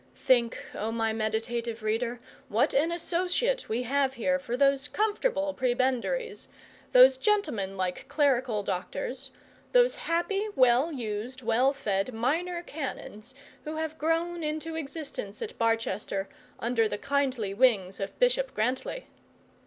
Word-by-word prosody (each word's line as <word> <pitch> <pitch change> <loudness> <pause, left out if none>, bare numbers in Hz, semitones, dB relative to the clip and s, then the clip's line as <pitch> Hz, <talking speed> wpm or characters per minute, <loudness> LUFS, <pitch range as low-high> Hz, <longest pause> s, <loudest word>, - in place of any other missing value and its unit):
Think, 240 -3 +2 0.2
oh, 220 +2 -3
my 225 -1 0
meditative 225 +1 -2
reader, 230 +3 -1 0.3
what 225 +2 +2
an 310 +5 +2
associate 365 +9 0
we 235 +3 0
have 270 +1 +1
here 275 +3 +1
for 245 -2 -3
those 275 +1 +3
comfortable 415 -8 0
prebendaries, 260 - -1 0.4
those 255 +1 +8
gentlemanlike 195 - -1
clerical 255 -7 +1
doctors, 250 +9 -4 0.4
those - - +5
happy 390 +5 -1
well 255 +5 +4
used, 240 0 -5
well 235 +4 +3
fed 215 -4 -2
minor 340 +9 -1
canons, 265 -6 -7 0.3
who 310 +1 -5
have 315 0 -4
grown 335 +2 0
into 310 +2 -3
existence 280 -9 -6
at - - -5
Barchester 220 -4 0 0.3
under 230 -1 +2
the 210 - -3
kindly 260 -5 0
wings 200 -5 +2
of 195 0 -5
Bishop - - +2
Grantly! 255 - -1
260 Hz, 125 wpm, -28 LUFS, 225-320 Hz, 0.4 s, those